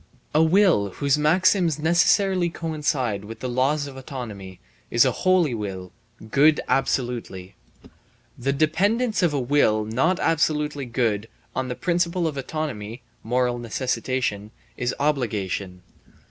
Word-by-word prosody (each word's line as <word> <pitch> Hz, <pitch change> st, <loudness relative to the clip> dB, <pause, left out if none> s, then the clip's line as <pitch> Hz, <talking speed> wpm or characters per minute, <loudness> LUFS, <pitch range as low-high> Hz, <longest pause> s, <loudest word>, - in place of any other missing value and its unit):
A 155 Hz, -, +4 dB
will 160 Hz, -, +3 dB
whose 140 Hz, -2 st, +1 dB
maxims 165 Hz, +1 st, +3 dB
necessarily 175 Hz, +3 st, +3 dB
coincide 150 Hz, -, -2 dB
with 115 Hz, +2 st, -9 dB
the 130 Hz, -, -4 dB
laws 135 Hz, +4 st, +1 dB
of 140 Hz, -2 st, -9 dB
autonomy 110 Hz, -9 st, -8 dB, 0.3 s
is 120 Hz, +2 st, +4 dB
a 130 Hz, -, +3 dB
holy 180 Hz, -1 st, +2 dB
will, 95 Hz, -4 st, -5 dB, 0.4 s
good 150 Hz, +2 st, +5 dB
absolutely. 120 Hz, -8 st, -2 dB, 0.8 s
The 135 Hz, +3 st, -1 dB
dependence 200 Hz, -, +1 dB
of 175 Hz, -3 st, +3 dB
a 145 Hz, -, -1 dB
will 120 Hz, -5 st, +2 dB
not 135 Hz, +12 st, +1 dB
absolutely 150 Hz, -3 st, 0 dB
good 115 Hz, -3 st, -1 dB, 0.3 s
on 130 Hz, -1 st, -1 dB
the 125 Hz, -, -4 dB
principle 175 Hz, +1 st, 0 dB
of 155 Hz, -3 st, -2 dB
autonomy 130 Hz, -5 st, -5 dB, 0.2 s
(moral 125 Hz, +1 st, 0 dB
necessitation) 120 Hz, -3 st, -2 dB, 0.3 s
is 125 Hz, +1 st, -2 dB
obligation. 100 Hz, -10 st, -2 dB
135 Hz, 125 wpm, -24 LUFS, 115-160 Hz, 0.8 s, good